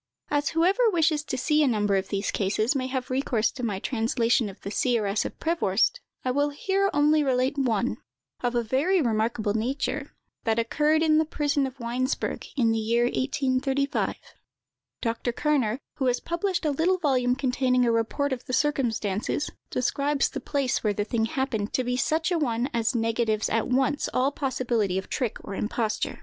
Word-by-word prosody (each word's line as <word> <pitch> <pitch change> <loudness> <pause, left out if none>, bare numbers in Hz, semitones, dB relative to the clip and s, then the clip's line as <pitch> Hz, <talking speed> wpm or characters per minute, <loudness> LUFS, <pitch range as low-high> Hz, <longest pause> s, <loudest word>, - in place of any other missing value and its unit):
As 290 0 +1
whoever 390 +8 +4
wishes 320 -5 +2
to 260 - -3
see 300 +4 +2
a 295 - +4
number 210 -4 +1
of 190 0 0
these 200 0 -1
cases 215 +6 0
may 260 -1 -1
have 260 -1 -3
recourse 250 -4 +1
to 265 - -8
my 215 -5 -1
translation 230 0 +1
of 195 - -12
the 200 - -6
"Seeress 215 -4 +1
of - - -6
Prevorst," 275 - +1 0.3
I 255 - +2
will 285 +3 +1
here 390 +7 0
only 300 +1 +3
relate 260 0 +1
one, 245 -3 0 0.4
of 245 -1 -1
a 240 - +2
very 285 - +2
remarkable 220 -4 0
nature, 270 +5 -2 0.3
that 225 -1 +1
occurred 300 +7 +2
in 310 -1 +4
the - - +4
prison 290 -3 0
of 265 +1 -11
Weinsberg, 245 +3 -2
in 230 -4 +3
the 225 - +1
year 230 +2 +1
1835. 270 +2 0 0.9
Dr. 230 +1 -1
Kerner, 255 -4 +1 0.2
who 265 -3 0
has 250 0 +2
published 345 0 -2
a 300 - +2
little 335 +6 +2
volume 255 -7 +2
containing 255 -1 +1
a 235 - +3
report 230 +5 0
of 255 -1 -7
the 255 - -4
circumstances, 240 -4 0 0.2
describes 280 +3 0
the - - -5
place 275 -3 -1
where 210 -2 +2
the 205 +1 -2
thing 225 0 0
happened 225 -4 -2
to 255 - +1
be 250 0 -1
such 315 +6 0
a 345 - +2
one 245 -1 0
as 235 +2 0
negatives 225 -1 0
at 225 0 +1
once 265 +3 +1
all 260 +2 +2
possibility 240 -9 -1
of 190 - -4
trick 245 -6 -2
or - - -7
imposture. 215 +1 -2
255 Hz, 180 wpm, -26 LUFS, 225-290 Hz, 0.9 s, whoever